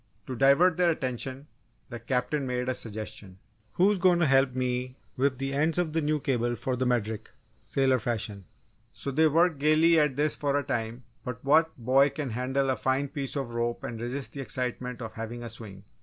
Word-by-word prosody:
To 130 - -5
divert 140 +7 +5
their 180 -1 +4
attention, 130 -2 -3 0.5
the 120 - -5
Captain 130 +4 -1
made 125 0 -2
a 130 - +1
suggestion. 105 -5 -6 0.4
"Who's 195 +2 +3
goin' 180 -1 +4
to 170 - +3
help 135 -2 +3
me 125 0 -2 0.2
whip 130 0 +1
the 135 +1 -3
ends 155 +4 +1
of 170 -3 0
the 165 - +1
new 150 0 +1
cable 120 -3 0
for 130 +1 -2
the 130 0 0
Medric, 110 -3 -1 0.3
sailor 130 -2 +1
fashion?" 110 -4 -3 0.5
So 140 - -5
they 160 +4 +4
worked 160 0 +3
gaily 155 +3 +5
at 150 -3 +2
this 150 +2 +1
for 145 -1 0
a 145 - 0
time, 120 -2 -3 0.2
but 125 +1 -6
what 160 +3 +3
boy 130 +4 +4
can 140 -2 -4
handle 130 +3 0
a - - +1
fine 135 +2 0
piece 140 -2 -4
of 135 -4 -3
rope 120 0 -2
and 115 -2 -5
resist 130 +3 -4
the 140 - -5
excitement 125 -1 -4
of 110 -1 -7
having 115 +2 -6
a 120 - -5
swing? 105 -4 -8
130 Hz, 200 wpm, -28 LUFS, 120-145 Hz, 0.5 s, divert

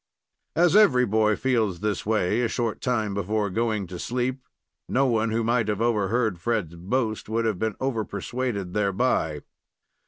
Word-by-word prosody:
As 175 +2 +4
every 140 -13 +6
boy 110 0 +2
feels 110 -9 0
this 105 -1 -2
way 110 0 +1
a 120 - +2
short 115 -2 -2
time 110 -5 0
before 100 +1 -1
going 110 -1 0
to 90 0 -8
sleep, 125 +2 -2 0.5
no 135 +2 +2
one 115 -3 +1
who 115 +1 0
might 115 -1 +1
have 105 -1 -1
overheard 110 -3 +1
Fred's 105 -5 -1
boast 110 +6 -2
would 115 +1 0
have 105 -5 0
been 110 -2 -1
over 130 -5 -1
persuaded 100 -2 -4
thereby. 100 - 0
110 Hz, 160 wpm, -25 LUFS, 100-120 Hz, 0.5 s, every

